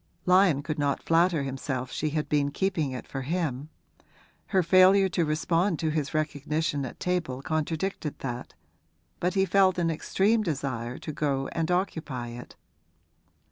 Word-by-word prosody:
Lyon 180 Hz, -6 st, +4 dB
could 155 Hz, 0 st, -3 dB
not 140 Hz, -1 st, 0 dB
flatter 165 Hz, -2 st, +3 dB
himself 135 Hz, -1 st, -4 dB
she 155 Hz, -, -1 dB
had 150 Hz, 0 st, -2 dB
been 145 Hz, -1 st, +1 dB
keeping 160 Hz, -2 st, -1 dB
it 130 Hz, -1 st, -6 dB
for 135 Hz, -, -5 dB
him; 150 Hz, -2 st, -2 dB, 0.8 s
her 190 Hz, -3 st, +2 dB
failure 185 Hz, +3 st, +6 dB
to 170 Hz, -1 st, +1 dB
respond 165 Hz, +4 st, +1 dB
to 160 Hz, 0 st, -1 dB
his 150 Hz, -2 st, -1 dB
recognition 150 Hz, -1 st, -1 dB
at -, -, -11 dB
table 165 Hz, -8 st, -2 dB
contradicted 155 Hz, +1 st, -2 dB
that, 120 Hz, -2 st, -6 dB, 0.6 s
but 180 Hz, +2 st, 0 dB
he 190 Hz, 0 st, +3 dB
felt 190 Hz, 0 st, +3 dB
an 170 Hz, -2 st, +1 dB
extreme 200 Hz, +7 st, +1 dB
desire 130 Hz, -, -3 dB
to 155 Hz, -, -6 dB
go 140 Hz, -2 st, -1 dB
and 165 Hz, 0 st, -2 dB
occupy 155 Hz, -9 st, -2 dB
it. 120 Hz, +1 st, -10 dB
155 Hz, 150 wpm, -27 LUFS, 140-180 Hz, 0.8 s, failure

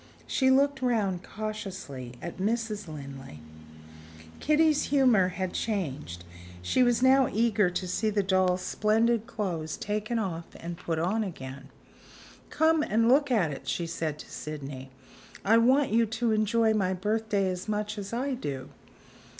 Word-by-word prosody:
She 260 Hz, -1 st, +2 dB
looked 275 Hz, +1 st, +3 dB
round 210 Hz, -8 st, 0 dB
cautiously 190 Hz, -, -6 dB
at 175 Hz, -, -6 dB
Mrs. 215 Hz, 0 st, -1 dB
Linley. 135 Hz, -, -9 dB, 1.0 s
Kitty's 305 Hz, 0 st, +3 dB
humor 250 Hz, -9 st, +4 dB
had 185 Hz, 0 st, -3 dB
changed; 150 Hz, -, -3 dB, 0.4 s
she 90 Hz, -, +2 dB
was 245 Hz, 0 st, +3 dB
now 265 Hz, 0 st, +5 dB
eager 215 Hz, -3 st, +2 dB
to 180 Hz, +1 st, -3 dB
see 215 Hz, +4 st, 0 dB
the 205 Hz, -1 st, +1 dB
doll's 185 Hz, -1 st, +2 dB
splendid 225 Hz, +3 st, +1 dB
clothes 170 Hz, -9 st, -3 dB
taken 210 Hz, +3 st, -2 dB
off 175 Hz, -6 st, -3 dB
and 170 Hz, +1 st, -6 dB
put 170 Hz, -2 st, -3 dB
on 190 Hz, +7 st, 0 dB
again. 135 Hz, -7 st, -8 dB, 0.8 s
"Come 320 Hz, 0 st, +3 dB
and 230 Hz, -4 st, +2 dB
look 285 Hz, +3 st, +4 dB
at 200 Hz, -11 st, +2 dB
it," 135 Hz, -, -8 dB
she 170 Hz, -, -1 dB
said 160 Hz, -2 st, -3 dB
to -, -, -12 dB
Sydney; 140 Hz, -3 st, -7 dB, 0.6 s
"I 225 Hz, +3 st, +5 dB
want 260 Hz, +3 st, +3 dB
you 230 Hz, +1 st, +3 dB
to 225 Hz, +1 st, -1 dB
enjoy 220 Hz, +1 st, +2 dB
my 190 Hz, -3 st, +1 dB
birthday 210 Hz, +1 st, 0 dB
as 185 Hz, +1 st, -4 dB
much 210 Hz, 0 st, -2 dB
as 200 Hz, -1 st, -6 dB
I 260 Hz, +4 st, -1 dB
do." 140 Hz, -, -5 dB
210 Hz, 150 wpm, -28 LUFS, 170-230 Hz, 1.0 s, now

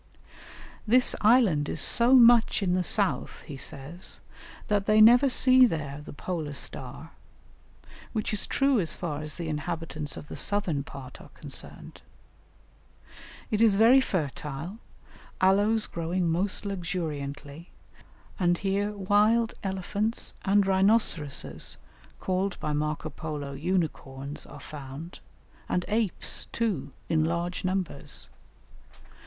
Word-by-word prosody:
"This 250 Hz, +3 st, +4 dB
island 210 Hz, -, +4 dB
is -, -, -3 dB
so 235 Hz, -, +4 dB
much 235 Hz, -3 st, +6 dB
in 180 Hz, -2 st, +1 dB
the 180 Hz, 0 st, +1 dB
south," 200 Hz, +1 st, +1 dB
he 145 Hz, -, -8 dB
says, 145 Hz, +5 st, -5 dB, 0.5 s
"that 205 Hz, -1 st, 0 dB
they 215 Hz, 0 st, +4 dB
never 240 Hz, +5 st, +7 dB
see 255 Hz, 0 st, +6 dB
there 150 Hz, -6 st, -4 dB
the -, -, -10 dB
polar 155 Hz, -1 st, -5 dB
star," -, -, -5 dB, 1.0 s
which 215 Hz, -1 st, -2 dB
is 210 Hz, -, -1 dB
true 275 Hz, -3 st, +2 dB
as 165 Hz, -5 st, -2 dB
far 155 Hz, -4 st, -4 dB
as 150 Hz, -1 st, -5 dB
the 170 Hz, -2 st, -5 dB
inhabitants 155 Hz, -1 st, -4 dB
of -, -, -9 dB
the -, -, -8 dB
southern 185 Hz, -9 st, 0 dB
part 135 Hz, -2 st, -11 dB
are -, -, -14 dB
concerned. -, -, -6 dB, 1.5 s
It 215 Hz, 0 st, +1 dB
is 220 Hz, -3 st, +5 dB
very 235 Hz, +6 st, +6 dB
fertile, 155 Hz, -, -4 dB, 0.6 s
aloes 205 Hz, +4 st, +3 dB
growing 170 Hz, +2 st, -2 dB
most 190 Hz, +5 st, 0 dB
luxuriantly; 160 Hz, -5 st, -5 dB, 0.7 s
and 175 Hz, -2 st, +2 dB
here 200 Hz, +2 st, -1 dB
wild 210 Hz, +4 st, +2 dB
elephants 200 Hz, +4 st, -2 dB
and 200 Hz, 0 st, +3 dB
rhinoceroses 190 Hz, -7 st, +2 dB, 0.4 s
(called 190 Hz, +1 st, -2 dB
by 150 Hz, -, -2 dB
Marco 150 Hz, +1 st, -2 dB
Polo 145 Hz, -1 st, -6 dB
unicorns) 145 Hz, -3 st, -3 dB
are -, -, -11 dB
found, 150 Hz, +3 st, -9 dB, 0.5 s
and 180 Hz, 0 st, 0 dB
apes, 215 Hz, -3 st, -1 dB
too, 180 Hz, -13 st, -2 dB, 0.2 s
in 160 Hz, -1 st, +2 dB
large 170 Hz, +2 st, -2 dB
numbers. 185 Hz, -6 st, -3 dB
180 Hz, 120 wpm, -27 LUFS, 150-210 Hz, 1.5 s, never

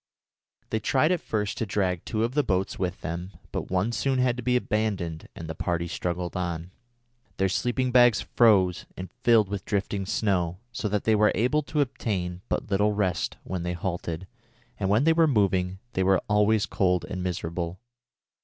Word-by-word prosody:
They 110 Hz, -, +1 dB
tried 135 Hz, -, +2 dB
at 180 Hz, -, +1 dB
first 105 Hz, -2 st, -2 dB
to 115 Hz, -, 0 dB
drag 90 Hz, -3 st, -1 dB
two 110 Hz, -1 st, -1 dB
of 120 Hz, +2 st, -1 dB
the 150 Hz, -, +3 dB
boats 95 Hz, -6 st, -1 dB
with 90 Hz, -1 st, -2 dB
them, 90 Hz, +3 st, -5 dB, 0.2 s
but -, -, -4 dB
one 95 Hz, +5 st, +1 dB
soon 135 Hz, +2 st, 0 dB
had 125 Hz, -1 st, +2 dB
to 125 Hz, -, -5 dB
be 125 Hz, +1 st, +1 dB
abandoned 100 Hz, -9 st, -1 dB
and 80 Hz, -, -7 dB
the 80 Hz, -, -4 dB
party 85 Hz, +1 st, -2 dB
struggled 85 Hz, +1 st, -3 dB
on. 85 Hz, -1 st, -3 dB, 0.7 s
Their 95 Hz, 0 st, +2 dB
sleeping 125 Hz, +5 st, 0 dB
bags 120 Hz, -3 st, +6 dB
froze 95 Hz, -7 st, +3 dB
and 90 Hz, -1 st, -7 dB
filled 115 Hz, -4 st, +5 dB
with 100 Hz, -1 st, -4 dB
drifting 100 Hz, -1 st, -2 dB
snow 90 Hz, -5 st, 0 dB
so 110 Hz, -2 st, -3 dB
that 105 Hz, 0 st, 0 dB
they 110 Hz, -, +3 dB
were 105 Hz, 0 st, +4 dB
able 130 Hz, +7 st, +2 dB
to 150 Hz, 0 st, -1 dB
obtain 95 Hz, -9 st, -2 dB
but -, -, -2 dB
little 105 Hz, +2 st, +3 dB
rest 95 Hz, -4 st, -1 dB
when 95 Hz, -2 st, -4 dB
they 90 Hz, +1 st, -2 dB
halted, 85 Hz, -1 st, -4 dB, 0.5 s
and 95 Hz, -2 st, 0 dB
when 105 Hz, +6 st, +4 dB
they 165 Hz, +2 st, +5 dB
were 165 Hz, 0 st, +4 dB
moving 95 Hz, -7 st, +1 dB, 0.2 s
they 95 Hz, -, 0 dB
were 95 Hz, 0 st, +4 dB
always 105 Hz, 0 st, +3 dB
cold 90 Hz, -2 st, +1 dB
and 95 Hz, -2 st, -5 dB
miserable. 85 Hz, 0 st, -3 dB
100 Hz, 185 wpm, -26 LUFS, 90-115 Hz, 0.7 s, bags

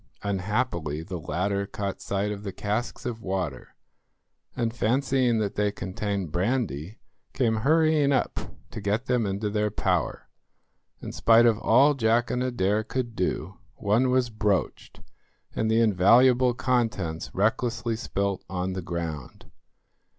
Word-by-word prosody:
Unhappily 95 Hz, -, -1 dB
the 90 Hz, 0 st, -6 dB
latter 100 Hz, +5 st, -1 dB
caught 100 Hz, -1 st, -4 dB
sight 100 Hz, +1 st, -1 dB
of 100 Hz, -1 st, -5 dB
the 100 Hz, -1 st, -5 dB
casks 105 Hz, +5 st, -3 dB
of 115 Hz, -2 st, -4 dB
water, 95 Hz, -9 st, -4 dB, 0.8 s
and, 115 Hz, -2 st, -1 dB
fancying 125 Hz, 0 st, +1 dB
that 105 Hz, -2 st, -1 dB
they 105 Hz, 0 st, +1 dB
contained 100 Hz, -3 st, -4 dB
brandy, 95 Hz, -, -1 dB, 0.4 s
came 115 Hz, -4 st, +1 dB
hurrying 155 Hz, +2 st, +3 dB
up 135 Hz, -, 0 dB, 0.3 s
to 110 Hz, -, -6 dB
get 105 Hz, +5 st, -1 dB
them 125 Hz, -4 st, +1 dB
into 100 Hz, +2 st, -2 dB
their 105 Hz, 0 st, 0 dB
power. 90 Hz, -6 st, -1 dB, 0.8 s
In -, -, -5 dB
spite 115 Hz, +1 st, +5 dB
of 115 Hz, -2 st, +3 dB
all 140 Hz, +6 st, +5 dB
Jack 115 Hz, -2 st, +1 dB
and 125 Hz, -, -1 dB
Adair 110 Hz, -4 st, 0 dB
could 120 Hz, 0 st, -4 dB
do, 95 Hz, -1 st, -2 dB, 0.2 s
one 110 Hz, +6 st, +2 dB
was 125 Hz, -2 st, +1 dB
broached 105 Hz, -3 st, -2 dB, 0.5 s
and 110 Hz, -, 0 dB
the 110 Hz, +1 st, +3 dB
invaluable 120 Hz, +5 st, +5 dB
contents 110 Hz, -11 st, -1 dB
recklessly 115 Hz, +3 st, 0 dB
spilt 100 Hz, -3 st, -2 dB
on 95 Hz, 0 st, -2 dB
the 95 Hz, -, -4 dB
ground. 80 Hz, -5 st, -6 dB
105 Hz, 135 wpm, -26 LUFS, 95-120 Hz, 0.8 s, spite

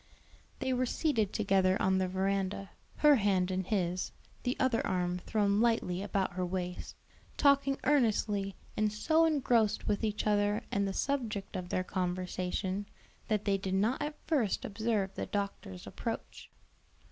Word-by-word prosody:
They 260 Hz, 0 st, -1 dB
were 255 Hz, 0 st, +1 dB
seated 230 Hz, -, +1 dB
together 195 Hz, -3 st, +2 dB
on 190 Hz, 0 st, +2 dB
the 185 Hz, -, +1 dB
veranda, 195 Hz, +1 st, -1 dB, 0.2 s
her 295 Hz, -2 st, +6 dB
hand 190 Hz, -4 st, +2 dB
in 185 Hz, 0 st, -1 dB
his, 180 Hz, -2 st, -1 dB, 0.3 s
the 250 Hz, -, -1 dB
other 260 Hz, -3 st, +2 dB
arm 180 Hz, -1 st, -1 dB
thrown 205 Hz, +1 st, +1 dB
lightly 225 Hz, -6 st, +1 dB
about 195 Hz, -2 st, -1 dB
her 180 Hz, 0 st, -2 dB
waist, 180 Hz, 0 st, -4 dB, 0.4 s
talking 280 Hz, -1 st, +4 dB
earnestly, 215 Hz, -7 st, +2 dB, 0.2 s
and 215 Hz, 0 st, +1 dB
so 315 Hz, +10 st, +3 dB
engrossed 245 Hz, -9 st, +2 dB
with 205 Hz, +2 st, 0 dB
each 210 Hz, -1 st, -1 dB
other 205 Hz, 0 st, +2 dB
and 200 Hz, 0 st, +1 dB
the -, -, -1 dB
subject 220 Hz, -7 st, -2 dB
of 180 Hz, -1 st, -4 dB
their 185 Hz, -, 0 dB
conversation, 185 Hz, +2 st, -2 dB, 0.4 s
that 215 Hz, -2 st, 0 dB
they 200 Hz, -1 st, +2 dB
did 190 Hz, 0 st, -2 dB
not 215 Hz, +7 st, +1 dB
at 300 Hz, 0 st, -3 dB
first 265 Hz, -, +1 dB
observe 210 Hz, -2 st, -1 dB
the -, -, -4 dB
doctor's 200 Hz, -, -4 dB
approach. -, -, -6 dB
200 Hz, 150 wpm, -32 LUFS, 185-230 Hz, 0.4 s, her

